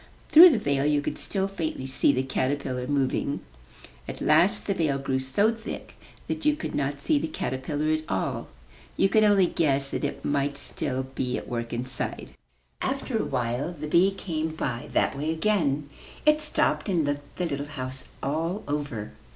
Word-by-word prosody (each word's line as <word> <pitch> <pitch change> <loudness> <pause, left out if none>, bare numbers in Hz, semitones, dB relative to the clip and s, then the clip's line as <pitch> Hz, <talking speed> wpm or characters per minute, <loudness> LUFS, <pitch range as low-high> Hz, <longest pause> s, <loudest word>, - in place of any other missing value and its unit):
Through 345 +4 +11
the 280 - +2
veil 140 -8 0
you 150 0 +3
could 145 - -3
still 195 -1 -1
faintly 165 -8 -4
see 135 +2 +3
the 130 -1 0
caterpillar 130 -1 -2
moving. 140 0 0 0.7
At - - -6
last 180 +8 +4
the 200 - +1
veil 155 -7 0
grew 135 -1 -1
so 200 +13 +2
thick 225 0 -8 0.3
that - - -4
you 300 0 +3
could 310 - -5
not 140 0 -1
see 145 +1 +2
the 160 - -2
caterpillar 145 +3 -2
at 155 0 -3
all. 95 -1 -2 0.5
You 195 - +4
could 215 +2 +4
only 205 -3 +5
guess 140 -5 +1
that - - -3
it 145 - -3
might 140 0 0
still 135 -1 -1
be 125 -1 -1
at - - -7
work 115 -1 -3
inside. 125 +1 -3 0.5
After - - -1
a - - 0
while 125 +8 -2
the 155 - -4
bee 170 +5 +4
came 160 -5 -3
by 120 -6 -3
that - - +2
way 145 +3 -2
again. 160 -5 +1 0.4
It 305 0 +5
stopped 300 -7 0
and 170 -5 +2
looked 145 0 -4
the 180 - 0
little 145 -3 -3
house 130 -3 -6 0.2
all 165 +8 -1
over. 145 -7 -3
145 Hz, 180 wpm, -26 LUFS, 135-175 Hz, 0.7 s, Through